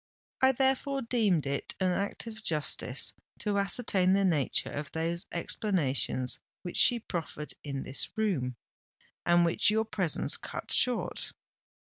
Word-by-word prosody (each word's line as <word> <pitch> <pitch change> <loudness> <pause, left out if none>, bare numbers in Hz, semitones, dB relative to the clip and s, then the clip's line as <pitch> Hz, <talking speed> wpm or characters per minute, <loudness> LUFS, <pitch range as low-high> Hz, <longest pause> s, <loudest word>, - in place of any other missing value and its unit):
I 265 0 +6
therefore 270 +1 +1
deemed 215 - +1
it 140 0 -3
an 185 -1 +2
act 200 +5 -2
of 220 -1 -8
justice 150 - 0 0.2
to 205 -1 0
ascertain 200 -2 +3
the 195 0 +3
nature 155 -7 0
of 145 0 -5
those 165 +2 -2
explanations 150 - 0 0.2
which 175 - -4
she 245 - +7
proffered 160 -7 -5
in 140 -2 -4
this 135 - -3
room, 155 - 0 0.7
and 175 0 +5
which 170 +4 +2
your 220 +1 +2
presence 190 -7 +1
cut - - -7
short. 250 -2 0
185 Hz, 135 wpm, -30 LUFS, 150-220 Hz, 0.7 s, she